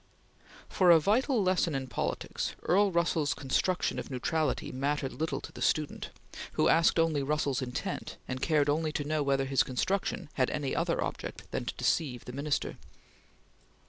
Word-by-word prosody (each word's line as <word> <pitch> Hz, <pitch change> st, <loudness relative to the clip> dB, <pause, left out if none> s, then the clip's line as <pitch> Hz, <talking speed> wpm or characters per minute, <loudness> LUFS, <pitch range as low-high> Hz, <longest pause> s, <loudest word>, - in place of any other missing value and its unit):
For 185 Hz, -2 st, +3 dB
a 170 Hz, -1 st, +9 dB
vital 225 Hz, -, +2 dB
lesson 185 Hz, -4 st, +1 dB
in 135 Hz, -1 st, -2 dB
politics, 130 Hz, -, -3 dB
Earl 200 Hz, +2 st, +3 dB
Russell's 170 Hz, -3 st, +1 dB
construction 175 Hz, +7 st, 0 dB
of -, -, -6 dB
neutrality 155 Hz, +4 st, -1 dB
mattered 140 Hz, +1 st, -1 dB
little 160 Hz, +1 st, -2 dB
to -, -, -9 dB
the -, -, -10 dB
student, 155 Hz, -2 st, 0 dB, 0.4 s
who -, -, +3 dB
asked 165 Hz, +1 st, +4 dB
only 165 Hz, -3 st, +2 dB
Russell's 140 Hz, -2 st, 0 dB
intent, 125 Hz, -1 st, -4 dB
and 130 Hz, 0 st, -4 dB
cared 150 Hz, -2 st, +2 dB
only 155 Hz, +2 st, +1 dB
to 145 Hz, -, -1 dB
know 155 Hz, +1 st, 0 dB
whether 135 Hz, -1 st, +1 dB
his 135 Hz, 0 st, +2 dB
construction 185 Hz, +6 st, -1 dB
had 130 Hz, -2 st, +1 dB
any 145 Hz, -3 st, -2 dB
other -, -, 0 dB
object -, -, -6 dB
than -, -, -2 dB
to -, -, -4 dB
deceive 130 Hz, -7 st, 0 dB
the 125 Hz, -, -7 dB
Minister. 145 Hz, +2 st, -2 dB
150 Hz, 165 wpm, -30 LUFS, 135-170 Hz, 0.4 s, a